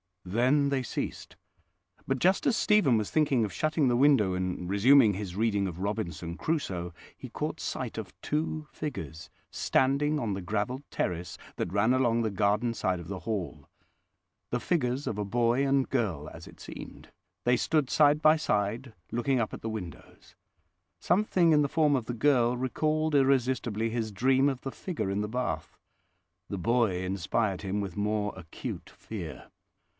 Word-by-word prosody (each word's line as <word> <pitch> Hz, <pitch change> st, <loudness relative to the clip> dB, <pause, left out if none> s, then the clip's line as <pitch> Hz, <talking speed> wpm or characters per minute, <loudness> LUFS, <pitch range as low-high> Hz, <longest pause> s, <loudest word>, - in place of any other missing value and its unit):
Then 130 Hz, +9 st, +2 dB
they 135 Hz, -1 st, 0 dB
ceased; -, -, -5 dB, 0.7 s
but 135 Hz, -, +1 dB
just 185 Hz, +8 st, +2 dB
as 245 Hz, -, +3 dB
Stephen 210 Hz, -, +4 dB
was 105 Hz, -2 st, -2 dB
thinking 140 Hz, -6 st, +2 dB
of 105 Hz, -, -2 dB
shutting 155 Hz, -, +1 dB
the 120 Hz, -, +3 dB
window 125 Hz, -8 st, +4 dB
and 90 Hz, -1 st, -3 dB
resuming 110 Hz, +3 st, +6 dB
his 95 Hz, -2 st, -5 dB
reading 100 Hz, -2 st, +1 dB
of 90 Hz, -1 st, -6 dB
Robinson 90 Hz, -4 st, -3 dB
Crusoe, 90 Hz, -, -2 dB, 0.2 s
he -, -, -9 dB
caught -, -, -4 dB
sight -, -, -4 dB
of -, -, -6 dB
two 155 Hz, 0 st, -2 dB
figures 85 Hz, -, -6 dB, 0.2 s
standing 145 Hz, +3 st, +1 dB
on 110 Hz, -6 st, -1 dB
the 95 Hz, -, -4 dB
gravelled 110 Hz, +8 st, -2 dB
terrace 90 Hz, 0 st, -3 dB, 0.2 s
that 90 Hz, -, -3 dB
ran 105 Hz, +5 st, +3 dB
along 120 Hz, -3 st, +2 dB
the 110 Hz, -, 0 dB
garden 105 Hz, +4 st, +1 dB
side 95 Hz, -5 st, -1 dB
of 85 Hz, -, -9 dB
the 95 Hz, -2 st, -4 dB
Hall—the 105 Hz, -, -7 dB
figures 135 Hz, -3 st, 0 dB
of 105 Hz, -, -3 dB
a 105 Hz, -, -2 dB
boy 120 Hz, +5 st, +2 dB
and 135 Hz, -1 st, +2 dB
girl, 95 Hz, -, -1 dB
as 80 Hz, +1 st, -11 dB
it -, -, -15 dB
seemed; -, -, -10 dB, 0.3 s
they 125 Hz, 0 st, +3 dB
stood 150 Hz, 0 st, +1 dB
side 150 Hz, 0 st, +4 dB
by 155 Hz, 0 st, +6 dB
side, 115 Hz, -1 st, -1 dB, 0.2 s
looking 125 Hz, +2 st, +1 dB
up 110 Hz, -, -1 dB
at -, -, -7 dB
the 115 Hz, -, -3 dB
windows. 95 Hz, -7 st, -9 dB, 0.6 s
Something 180 Hz, -2 st, +3 dB
in 150 Hz, -1 st, +5 dB
the 145 Hz, -, +1 dB
form 150 Hz, -2 st, +3 dB
of 125 Hz, -4 st, -1 dB
the 120 Hz, -, -4 dB
girl 125 Hz, -1 st, +3 dB
recalled 155 Hz, +5 st, 0 dB
irresistibly 130 Hz, -5 st, +2 dB
his 115 Hz, -1 st, -2 dB
dream 130 Hz, +6 st, +3 dB
of 130 Hz, -2 st, -4 dB
the 135 Hz, -, -5 dB
figure 155 Hz, -, -4 dB
in 100 Hz, +1 st, -1 dB
the 105 Hz, -, -2 dB
bath. 105 Hz, -10 st, -3 dB, 0.7 s
The 100 Hz, -, -3 dB
boy 105 Hz, -2 st, +1 dB
inspired 95 Hz, +2 st, -1 dB
him 100 Hz, +1 st, -1 dB
with 95 Hz, -2 st, -6 dB
more 105 Hz, 0 st, 0 dB
acute 85 Hz, -4 st, -7 dB
fear. 90 Hz, -8 st, -8 dB
115 Hz, 170 wpm, -29 LUFS, 100-140 Hz, 0.7 s, resuming